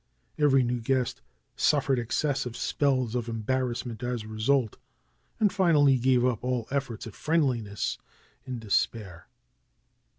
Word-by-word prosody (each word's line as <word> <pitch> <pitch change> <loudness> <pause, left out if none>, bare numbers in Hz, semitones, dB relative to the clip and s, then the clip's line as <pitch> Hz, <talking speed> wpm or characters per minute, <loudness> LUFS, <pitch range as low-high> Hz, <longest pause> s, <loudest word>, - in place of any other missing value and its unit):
Every 135 -3 +4
new 120 0 -1
guest 130 +1 -1 0.3
suffered 135 -3 +2
excessive 125 0 -1
spells 130 -5 0
of 120 -2 -2
embarrassment 120 +1 -2
as 120 -2 -3
a - - -11
result, 110 +2 0 0.6
and 210 -4 +3
finally 150 -9 +4
gave 125 0 +3
up 125 -3 0
all 125 -3 -1
efforts 135 -5 -3
at 110 - -8
friendliness 125 -11 -1 0.4
in 130 -2 -5
despair. 100 -4 -2
125 Hz, 125 wpm, -27 LUFS, 115-135 Hz, 0.6 s, Every